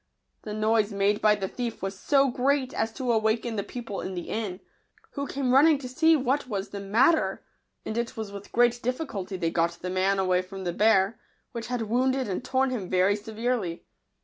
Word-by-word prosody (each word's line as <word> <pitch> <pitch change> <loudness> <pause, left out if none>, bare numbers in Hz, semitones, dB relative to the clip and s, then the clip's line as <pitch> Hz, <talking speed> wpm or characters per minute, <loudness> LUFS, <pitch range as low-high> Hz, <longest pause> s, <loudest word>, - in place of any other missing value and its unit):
The 210 -1 -6
noise 215 0 +2
made 200 +1 +1
by 215 -1 +5
the 195 -2 -3
thief 235 0 -5
was 195 0 -3
so 275 -2 +3
great 265 +1 +1
as 225 0 -1
to 250 0 -1
awaken 225 +1 +1
the 205 - 0
people 230 -4 -6
in 185 - -5
the 175 - -5
inn, 205 -5 -3 0.5
who 280 -1 -4
came 265 -2 -1
running 295 +3 +6
to 270 -2 -7
see 320 +6 +4
what 270 -1 0
was 200 -4 -3
the 200 - -6
mat 220 +11 +4
ter; 320 - -1 0.4
and 220 - -4
it 235 0 -3
was 220 -2 -5
with 200 0 -10
great 240 0 +3
difficulty 225 - -3
they 165 -2 -1
got 170 +1 +1
the 180 +1 -6
man 190 +1 +1
away 185 -1 +2
from 190 +1 -8
the 175 -1 -2
bear, 210 +1 +3 0.3
which 235 -1 -6
had 245 -2 -2
wounded 255 +4 +1
and 195 +4 -3
tom 260 +1 +1
him 205 -8 -4
very 185 +2 +3
severely. 220 -4 -3
220 Hz, 205 wpm, -27 LUFS, 195-255 Hz, 0.5 s, running